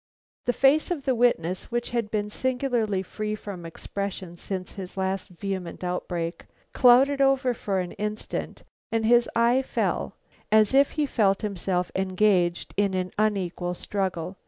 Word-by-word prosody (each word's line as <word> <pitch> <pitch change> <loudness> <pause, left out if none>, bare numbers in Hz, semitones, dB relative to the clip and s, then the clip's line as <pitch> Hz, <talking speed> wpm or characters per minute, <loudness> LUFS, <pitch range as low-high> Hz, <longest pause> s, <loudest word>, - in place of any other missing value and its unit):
The - - +3
face 275 +4 +4
of 325 -6 -3
the 265 - +3
witness, 190 -8 +1
which 240 0 -2
had 235 -3 -1
been 210 -1 -2
singularly 245 -6 0
free 215 +2 -4
from 190 -5 -7
expression 190 +1 -5
since 185 +1 -5
his 190 -1 -8
last 190 0 -2
vehement 185 -1 -5
outbreak, 175 -1 -3 0.3
clouded 270 +3 +5
over 270 -2 +3
for 200 -4 -2
an 180 -1 -3
instant 210 +1 -4 0.3
and 225 -1 +1
his 240 +1 +4
eye 235 +3 +4
fell 265 - -2 0.4
as 215 +1 +5
if 275 +1 +4
he 305 -2 +1
felt 205 -6 +1
himself 185 -3 -1
engaged 185 -2 +1
in 200 -2 +2
an 185 -1 -2
unequal 185 -4 0
struggle. 185 -2 -3
205 Hz, 150 wpm, -26 LUFS, 185-240 Hz, 0.4 s, clouded